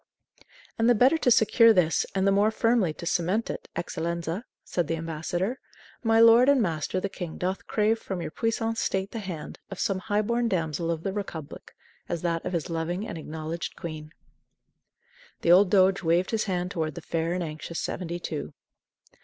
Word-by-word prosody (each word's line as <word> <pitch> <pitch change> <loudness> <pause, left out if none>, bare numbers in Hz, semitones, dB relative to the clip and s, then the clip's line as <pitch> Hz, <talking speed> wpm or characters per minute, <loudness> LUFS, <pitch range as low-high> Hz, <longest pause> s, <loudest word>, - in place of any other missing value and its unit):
"And 225 +1 +4
the 245 - +6
better 260 +8 +4
to 250 - +2
secure 230 0 +6
this 170 -5 +2
and 190 0 +2
the 195 - +4
more 200 +2 +4
firmly 225 -5 +2
to 160 - -9
cement 180 +6 0
it, - - -8
Eccellenza," 170 +4 -3 0.2
said 175 -4 -2
the 165 - 0
ambassador, 165 +8 -3 0.4
"my 225 -1 +3
lord 230 +3 +7
and 280 -2 +5
master 170 -3 -1
the 200 - -2
king 175 -4 -7
doth 185 +1 -3
crave 220 +1 +1
from 190 -4 -5
your 170 - -5
puissant 225 +1 -1
state 190 +1 -1
the 230 - -4
hand, 175 -7 -7
of 195 - -7
some 195 -2 0
high 205 +2 0
born 235 +2 0
damsel 165 -4 -1
of 165 -1 -2
the 195 - -2
Republic 165 -7 -7 0.3
as 170 -1 -3
that 165 -1 -1
of 180 - -4
his 170 -1 -1
loving 175 +4 -3
and 165 - -6
acknowledged 160 +2 -5
queen." 155 -2 -7 1.3
The 170 - +3
old 185 +2 +7
doge 190 0 +4
waved 175 +2 +1
his 225 -2 0
hand 180 -2 -2
toward 160 -6 -2
the - - -6
fair 165 +1 -2
and 180 0 -1
anxious 155 +1 -5
seventy 175 -1 -3
two. 160 -3 -5
180 Hz, 185 wpm, -27 LUFS, 165-215 Hz, 1.3 s, lord